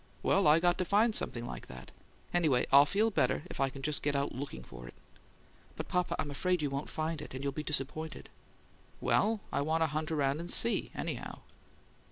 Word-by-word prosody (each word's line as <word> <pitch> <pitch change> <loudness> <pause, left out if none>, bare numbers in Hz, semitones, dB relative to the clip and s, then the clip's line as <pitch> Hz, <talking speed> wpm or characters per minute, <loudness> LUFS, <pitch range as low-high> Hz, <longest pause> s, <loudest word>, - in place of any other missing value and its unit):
Well, 195 -4 +3
I 150 +2 +6
got 175 +2 +2
to - - +2
find 215 +5 +3
something 120 - -2
like - - -7
that. 65 0 -10 0.4
Anyway, 155 -8 +3
I'll 140 +2 +8
feel 215 +5 +2
better 175 - +1
if - - -7
I 135 0 +2
can 135 +1 -10
just 150 0 +1
get 145 -1 0
out 140 +1 0
LOOKING 130 - -6
for - - -11
it." - - -12 0.8
"But, - - -6
papa, 180 -1 0
I'm 145 - -3
afraid 180 +3 0
you 145 - -1
won't 140 +1 -3
find 155 -1 -3
it, - - -8
and 130 - -5
you'll 140 - 0
be 150 - -3
disappointed." 155 +1 -3 0.7
"Well, 220 0 +2
I - - 0
want 160 +3 +1
to - - +4
hunt 155 0 -2
around 145 -1 +1
and 170 +1 -5
SEE, 235 - +2
anyhow." - - -5
150 Hz, 210 wpm, -32 LUFS, 140-175 Hz, 0.8 s, I'll